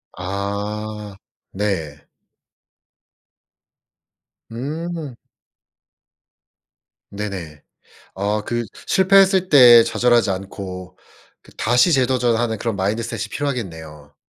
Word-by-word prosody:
아 100 +2 -5 0.4
네. 80 -8 -3 2.4
음. 155 +3 -5 1.9
네네. 95 -8 -7 0.5
아 105 +2 -1
그 120 +1 -2 0.2
실패했을 190 -1 +4
때 125 -7 +8
좌절하지 120 -3 +2
않고 95 -1 -7 0.5
그 - - -19
다시 125 +9 +3
재도전하는 120 -4 +1
그런 115 -2 -3
마인드셋이 105 +4 -2
필요하겠네요. 80 - -6
105 Hz, 165 characters per minute, -20 LUFS, 95-125 Hz, 2.4 s, 때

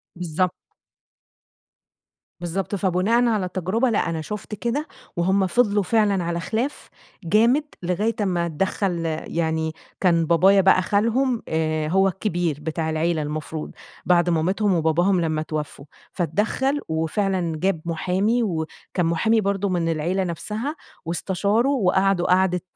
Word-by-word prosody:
بالضبط. 180 +1 -1 1.9
بالضبط، 185 +4 -2
فبناءً 195 +6 +2
على 210 -5 +1
تجربة 185 +8 0
لأ 210 -6 +1
أنا 160 -1 -2
شُفت 210 +4 -6
كده، 245 +8 -2 0.3
وهُم 190 +2 +2
فضلوا 205 0 +2
فعلًا 205 -2 +2
على 170 0 -2
خِلاف 230 - -3 0.3
جامد 230 - +3 0.2
لغاية 200 +6 0
أمّا 180 -4 0
اتدخل 175 +1 -1 0.2
يعني 160 -1 -1 0.3
كان 170 -3 +3
بابايا 190 +4 +5
بقى 190 -1 +5
خالهم 230 +5 +1
آآ، 155 -1 0
هو 190 +4 +3
الكبير 175 -5 -1
بتاع 160 +1 -2
العيلة 160 +1 0
المفروض، 150 +1 -5 0.3
بعد 175 0 +3
مامتهم 185 +5 +1
وباباهم 175 +3 +2
لمّا 155 -2 0
اتوفّوا، 150 -2 -5 0.3
فاتدخل 210 - 0
وفعلًا 165 +2 -1
جاب 185 -2 0
محامي 190 +8 0
و 165 -7 -1 0.3
كان 180 - +1
محامي 220 +7 +2
برضه 200 0 0
من 175 -2 0
العيلة 170 +5 -1
نفسها، 210 - -4 0.3
واستشاره 200 +8 0
وقعدوا 195 -7 +2
قعدة 180 -1 +3
185 Hz, 125 wpm, -23 LUFS, 165-205 Hz, 1.9 s, بابايا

